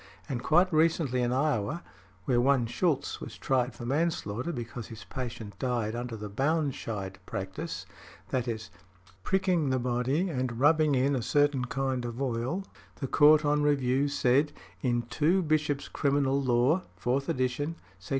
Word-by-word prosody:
And 125 -3 -3
quite 175 +6 +3
recently 155 -5 +2
in 120 0 +1
Iowa, 135 - 0 0.4
where 120 -2 +3
one 130 -1 +3
Shulz 140 +4 -1
was - - -8
tried 125 -2 0
for 120 - -7
manslaughter 140 -2 -1
because 120 -3 -6
his 110 -3 -10
patient 115 0 -6
died 120 -4 -1
under 120 -1 -4
the 105 0 -6
Baunscheidt 115 -6 -1
practice, 95 -1 -5 0.5
i. 130 - +3
e., 120 -2 -2 0.7
pricking 185 - +1
the 130 - +2
body 125 +7 0
and 130 -7 -2
rubbing 150 +1 +4
in 135 +2 +2
a 125 - -1
certain 145 0 +2
kind 130 -1 -1
of 120 0 -5
oil, 130 +8 -1 0.3
the 135 - -4
Court 150 +3 +5
on 150 0 +2
review 140 -2 +2
said: 140 +1 +2 0.3
"In 120 -2 +1
2 160 +10 +1
Bishop's 150 -2 0
Criminal 140 -1 +1
Law, 130 +7 +3 0.2
(4th 135 +3 0
Ed.) 145 +6 -1 0.2
sec. - - -14
130 Hz, 150 wpm, -29 LUFS, 120-150 Hz, 0.7 s, Court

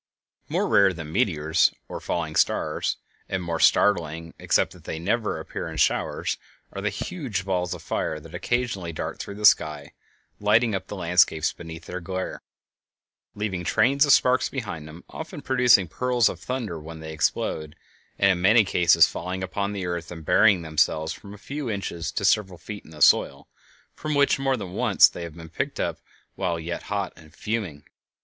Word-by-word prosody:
More - - 0
rare 100 -1 +5
than 80 -3 -8
meteors 80 -6 +2 0.2
or - - -6
falling 80 -3 -3
stars, - - +1 0.3
and 95 -1 -2
more 85 -1 -2
startling, 80 -4 +2
except - - +1
that - - -17
they - - -4
never 105 +7 -1
appear - - -6
in - - -7
showers, - - 0 0.3
are 100 - -5
the 105 - 0
huge 115 - -4
balls 90 -2 -1
of - - -12
fire 80 - -2
which 75 - -14
occasionally 115 -8 -2
dart - - -5
through 100 - -6
the 105 +1 -2
sky, 75 -7 +3 0.5
lighting 110 +2 +3
up 95 -1 -3
the - - -6
landscapes 85 -3 +2
beneath 80 -1 -9
with - - -16
their 90 - -5
glare, 95 +1 -4 0.9
leaving 100 -4 -3
trains 130 - +3
of 145 - +4
sparks 130 -1 +4
behind 100 - -5
them, 80 +3 -12
often 160 -2 -8
producing 125 -9 +4
peals 125 +3 +2
of - - -7
thunder 120 -10 -4
when 80 +1 -9
they 80 0 -7
explode, 75 0 -1 0.4
and 100 0 +4
in 90 -2 -1
many 110 +5 +6
cases 85 -3 +5
falling 95 +2 -4
upon 100 +2 -2
the 100 -3 -4
earth 85 -1 -4
and 80 -3 -9
burying 95 0 +4
themselves 80 0 +1
from 100 - -12
a 105 - -10
few 140 +4 -5
inches 95 -5 -3
to 100 - -2
several 95 -2 +2
feet 105 +4 -8
in - - -17
the 75 -2 0
soil, - - +4 0.5
from 155 0 -3
which, 140 -1 +3
more 135 -1 +1
than 95 -5 -7
once, - - +5
they - - -8
have 85 -2 -7
been 80 -1 -10
picked 80 - -4
up - - -2 0.3
while 90 -3 -2
yet 85 +1 -4
hot 100 -2 -2
and 80 0 -17
fuming. 100 -11 -3
95 Hz, 185 wpm, -25 LUFS, 80-105 Hz, 0.9 s, many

